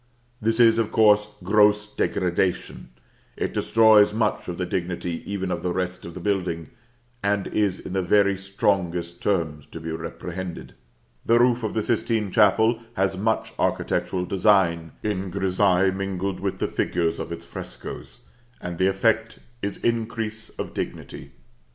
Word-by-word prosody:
This 115 Hz, +2 st, +1 dB
is, 115 Hz, -1 st, +6 dB
of 115 Hz, -, 0 dB
course, 105 Hz, -1 st, +4 dB
gross 105 Hz, +2 st, +4 dB
degradation; 90 Hz, -5 st, -1 dB, 0.5 s
it -, -, -2 dB
destroys 110 Hz, -2 st, +5 dB
much 110 Hz, -2 st, 0 dB
of 85 Hz, -, -4 dB
the 90 Hz, -, -1 dB
dignity 90 Hz, -1 st, -3 dB
even 95 Hz, -2 st, -2 dB
of -, -, -2 dB
the 90 Hz, -, -1 dB
rest 90 Hz, 0 st, -3 dB
of 85 Hz, -, -9 dB
the -, -, -6 dB
building, 90 Hz, -4 st, -2 dB, 0.5 s
and 100 Hz, -1 st, 0 dB
is 100 Hz, -3 st, 0 dB
in -, -, -7 dB
the 95 Hz, -, +1 dB
very 100 Hz, +2 st, +3 dB
strongest 95 Hz, -3 st, -1 dB
terms 80 Hz, -7 st, -1 dB
to 80 Hz, -, -9 dB
be 80 Hz, 0 st, -5 dB
reprehended. 90 Hz, +2 st, -6 dB, 0.5 s
The 115 Hz, -, +4 dB
roof 120 Hz, 0 st, +3 dB
of 110 Hz, -2 st, -3 dB
the 110 Hz, -, +1 dB
Sistine 110 Hz, -3 st, 0 dB
Chapel 110 Hz, +3 st, +4 dB, 0.2 s
has 95 Hz, 0 st, +1 dB
much 110 Hz, +4 st, -1 dB
architectural 90 Hz, -1 st, 0 dB
design 90 Hz, -4 st, +2 dB
in 100 Hz, -3 st, -2 dB
grissaille 95 Hz, 0 st, +2 dB
mingled 95 Hz, -1 st, -3 dB
with 95 Hz, 0 st, -2 dB
the -, -, -1 dB
figures 85 Hz, -2 st, -1 dB
of -, -, -5 dB
its 85 Hz, 0 st, -6 dB
frescoes; -, -, -8 dB, 0.4 s
and 90 Hz, -1 st, -6 dB
the 95 Hz, -, +4 dB
effect 110 Hz, +3 st, +1 dB, 0.2 s
is 100 Hz, -, -3 dB
increase 115 Hz, -1 st, -2 dB
of -, -, -5 dB
dignity. -, -, -6 dB
95 Hz, 150 wpm, -24 LUFS, 90-105 Hz, 0.5 s, is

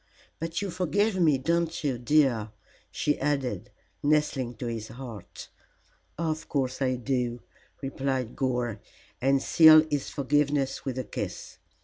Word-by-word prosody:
But 165 Hz, +4 st, -3 dB
you 195 Hz, -, -3 dB
forgive 190 Hz, +4 st, +1 dB
me, 160 Hz, -6 st, +4 dB
don't 165 Hz, +4 st, -1 dB
you, 135 Hz, -5 st, -1 dB
dear?" 125 Hz, -5 st, +2 dB, 0.4 s
she 150 Hz, -, -1 dB
added, 130 Hz, -9 st, -1 dB, 0.3 s
nestling 145 Hz, -5 st, +1 dB
to 115 Hz, -, -6 dB
his 115 Hz, -2 st, -4 dB
heart. 120 Hz, -6 st, -9 dB, 0.7 s
"Of 160 Hz, -1 st, -2 dB
course 130 Hz, -2 st, -1 dB
I 130 Hz, -1 st, +2 dB
do," 125 Hz, -1 st, -2 dB, 0.4 s
replied 135 Hz, -3 st, -2 dB
Gore, 125 Hz, -4 st, -1 dB, 0.4 s
and 135 Hz, +1 st, +2 dB
sealed 155 Hz, -1 st, +8 dB
his 145 Hz, -2 st, -1 dB
forgiveness 145 Hz, -1 st, 0 dB
with 130 Hz, -2 st, -3 dB
a 130 Hz, -, -1 dB
kiss. 105 Hz, -, -6 dB
135 Hz, 130 wpm, -27 LUFS, 125-155 Hz, 0.7 s, sealed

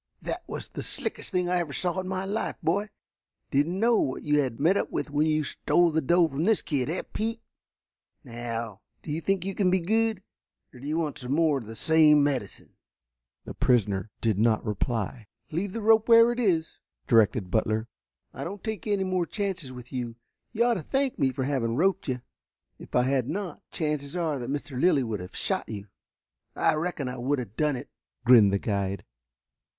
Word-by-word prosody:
"That -, -, -3 dB
was -, -, -5 dB
the -, -, -6 dB
slickest -, -, -3 dB
thing 180 Hz, -1 st, +1 dB
I 180 Hz, 0 st, +1 dB
ever 160 Hz, -5 st, -3 dB
saw 180 Hz, +4 st, 0 dB
in 175 Hz, -, -7 dB
all 185 Hz, -, -1 dB
my 190 Hz, 0 st, -3 dB
life, 205 Hz, +3 st, -2 dB
boy. 200 Hz, +6 st, +1 dB, 0.6 s
Didn't 155 Hz, +7 st, +1 dB
know 230 Hz, +1 st, +4 dB
what 130 Hz, -, -1 dB
you 150 Hz, 0 st, +2 dB
had 130 Hz, -5 st, -1 dB
met 165 Hz, +7 st, +4 dB
up -, -, 0 dB
with 145 Hz, -, -3 dB
when 150 Hz, +2 st, +2 dB
you 155 Hz, 0 st, +2 dB
stole 175 Hz, +4 st, +2 dB
the 160 Hz, +1 st, +1 dB
doe 170 Hz, +4 st, +4 dB
from 150 Hz, +2 st, -2 dB
this 220 Hz, 0 st, +3 dB
kid, 140 Hz, -3 st, -1 dB
eh, 165 Hz, -, -1 dB
Pete? 225 Hz, +1 st, -2 dB, 0.8 s
Now, 115 Hz, -4 st, -5 dB, 0.2 s
do 150 Hz, -, -6 dB
you 155 Hz, +2 st, -2 dB
think 195 Hz, 0 st, 0 dB
you 195 Hz, -, -2 dB
can 190 Hz, -1 st, +2 dB
be 185 Hz, +1 st, +3 dB
good, 220 Hz, +2 st, 0 dB, 0.5 s
or 125 Hz, -, -13 dB
do 140 Hz, -, -8 dB
you 155 Hz, +2 st, 0 dB
want 155 Hz, -4 st, -2 dB
some 125 Hz, 0 st, -3 dB
more 155 Hz, -2 st, +3 dB
of 115 Hz, -, -11 dB
the 115 Hz, -, -8 dB
same 155 Hz, +1 st, +5 dB
medicine?" 130 Hz, -8 st, -2 dB, 0.7 s
The -, -, -7 dB
prisoner 105 Hz, -5 st, +1 dB
did 110 Hz, -4 st, +1 dB
not 110 Hz, 0 st, +2 dB
reply. 110 Hz, +1 st, -2 dB, 0.2 s
"Leave 180 Hz, +5 st, -2 dB
the 225 Hz, +2 st, -5 dB
rope 220 Hz, +1 st, +4 dB
where 230 Hz, +1 st, +8 dB
it 240 Hz, -, -3 dB
is," 170 Hz, -9 st, 0 dB, 0.3 s
directed 110 Hz, -4 st, +3 dB
Butler. 110 Hz, +1 st, +1 dB, 0.5 s
"I -, -, -6 dB
don't 195 Hz, +2 st, -6 dB
take 220 Hz, -6 st, -4 dB
any 200 Hz, -2 st, +1 dB
more 185 Hz, -2 st, 0 dB
chances 190 Hz, -9 st, -3 dB
with 125 Hz, 0 st, -11 dB
you. 120 Hz, -3 st, -3 dB, 0.4 s
You 230 Hz, 0 st, +1 dB
ought 240 Hz, -, +3 dB
to 195 Hz, -, -3 dB
thank 270 Hz, -, -1 dB
me 130 Hz, -, +3 dB
for 130 Hz, 0 st, -3 dB
having 130 Hz, -4 st, 0 dB
roped 190 Hz, +5 st, +1 dB
you. 125 Hz, -2 st, -3 dB, 0.6 s
If -, -, -9 dB
I 125 Hz, -, +5 dB
had 130 Hz, -1 st, 0 dB
not, 185 Hz, -3 st, -4 dB
the -, -, -8 dB
chances 150 Hz, -1 st, -2 dB
are 160 Hz, -5 st, -1 dB
that 120 Hz, -, -5 dB
Mr. 140 Hz, -2 st, -3 dB
Lilly 150 Hz, -7 st, +4 dB
would 110 Hz, -4 st, -3 dB
have 90 Hz, 0 st, -9 dB
shot -, -, -1 dB
you." 105 Hz, -2 st, -7 dB, 0.7 s
"I 160 Hz, -, +3 dB
reckon 155 Hz, -3 st, -2 dB
I 125 Hz, +1 st, -5 dB
would 135 Hz, +4 st, 0 dB
have 115 Hz, -5 st, -6 dB
done 150 Hz, -2 st, +1 dB
it," 125 Hz, -, -8 dB, 0.3 s
grinned 115 Hz, -5 st, +7 dB
the 100 Hz, -, +2 dB
guide. 100 Hz, -2 st, -2 dB
150 Hz, 205 wpm, -27 LUFS, 125-185 Hz, 0.8 s, where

